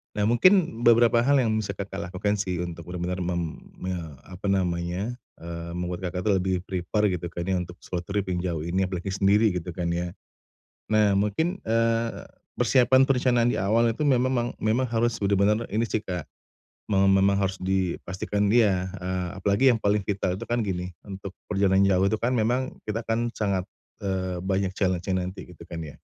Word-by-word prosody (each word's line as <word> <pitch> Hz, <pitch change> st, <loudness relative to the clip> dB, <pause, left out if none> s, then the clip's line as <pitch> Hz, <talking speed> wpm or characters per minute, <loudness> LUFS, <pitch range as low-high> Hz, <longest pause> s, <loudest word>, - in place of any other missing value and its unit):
Nah, 105 Hz, -, 0 dB
mungkin 160 Hz, -, +4 dB
beberapa 115 Hz, 0 st, +5 dB
hal 140 Hz, +1 st, +4 dB
yang 110 Hz, -4 st, +1 dB
bisa 105 Hz, -2 st, -1 dB
Kakak 95 Hz, -2 st, -6 dB
lakukan 105 Hz, +3 st, 0 dB
sih, 95 Hz, -3 st, -2 dB
untuk 85 Hz, -1 st, -5 dB
benar-benar 90 Hz, +1 st, -3 dB
mem 85 Hz, -2 st, -3 dB, 0.2 s
me 95 Hz, 0 st, -3 dB, 0.3 s
apa 95 Hz, +2 st, -6 dB
namanya, 90 Hz, +4 st, -1 dB, 0.2 s
eee, 85 Hz, 0 st, -6 dB
membuat, 90 Hz, +1 st, -4 dB
Kakak 90 Hz, +2 st, -3 dB
itu 105 Hz, -, +4 dB
lebih 95 Hz, 0 st, +1 dB
prepare 95 Hz, +3 st, 0 dB
gitu 85 Hz, 0 st, -5 dB
kan 85 Hz, +1 st, -5 dB
ya, 95 Hz, -, +1 dB
untuk 90 Hz, 0 st, -5 dB
solo 90 Hz, -1 st, -5 dB
trip 100 Hz, +1 st, -2 dB
yang 90 Hz, -1 st, -2 dB
jauh 85 Hz, -3 st, -2 dB
ini, 90 Hz, +3 st, 0 dB
apalagi 90 Hz, -1 st, -4 dB
sendiri 100 Hz, +1 st, +3 dB
gitu 90 Hz, 0 st, -4 dB
kan 85 Hz, 0 st, -3 dB
ya, 85 Hz, 0 st, -2 dB, 0.8 s
nah, 105 Hz, -2 st, +4 dB
mungkin, 105 Hz, -, 0 dB
eee, 115 Hz, 0 st, +1 dB, 0.3 s
persiapan 130 Hz, 0 st, +4 dB
perencanaan 125 Hz, -3 st, +3 dB
di -, -, -1 dB
awal 115 Hz, +4 st, +3 dB
itu 150 Hz, -, -3 dB
memang- 130 Hz, -2 st, +2 dB
memang 110 Hz, +4 st, +1 dB
harus 115 Hz, 0 st, +1 dB
sudah 100 Hz, 0 st, +2 dB
benar 105 Hz, +4 st, +2 dB
ini 110 Hz, +3 st, +1 dB
sih, 110 Hz, -, 0 dB
Kak, 90 Hz, -4 st, -4 dB, 0.7 s
me 95 Hz, -, +3 dB
memang 95 Hz, +1 st, +4 dB
harus 95 Hz, -1 st, 0 dB
dipastikan 95 Hz, +2 st, -1 dB
dia, 95 Hz, -6 st, +3 dB
eee, 90 Hz, -1 st, -2 dB
apalagi 100 Hz, +7 st, +4 dB
yang 115 Hz, -, 0 dB
paling 105 Hz, 0 st, +1 dB
vital 95 Hz, -2 st, -1 dB
itu -, -, -6 dB
kan 120 Hz, +1 st, -1 dB
gini, 90 Hz, -4 st, -2 dB, 0.2 s
untuk 95 Hz, -1 st, -7 dB, 0.2 s
perjalanan 100 Hz, -1 st, +3 dB
jauh 95 Hz, -1 st, +3 dB
itu 105 Hz, +2 st, +1 dB
kan 125 Hz, +2 st, 0 dB
memang 125 Hz, +4 st, 0 dB
kita 110 Hz, +1 st, -2 dB
kan 115 Hz, +1 st, 0 dB
sangat, 100 Hz, -5 st, -1 dB, 0.4 s
eee, 95 Hz, -2 st, -2 dB
banyak 95 Hz, -1 st, -1 dB
challenge-nya 95 Hz, -1 st, 0 dB
nanti 95 Hz, +1 st, -7 dB
gitu -, -, -12 dB
kan 85 Hz, -1 st, -7 dB
ya? 75 Hz, -3 st, -8 dB
100 Hz, 185 wpm, -26 LUFS, 90-115 Hz, 0.8 s, beberapa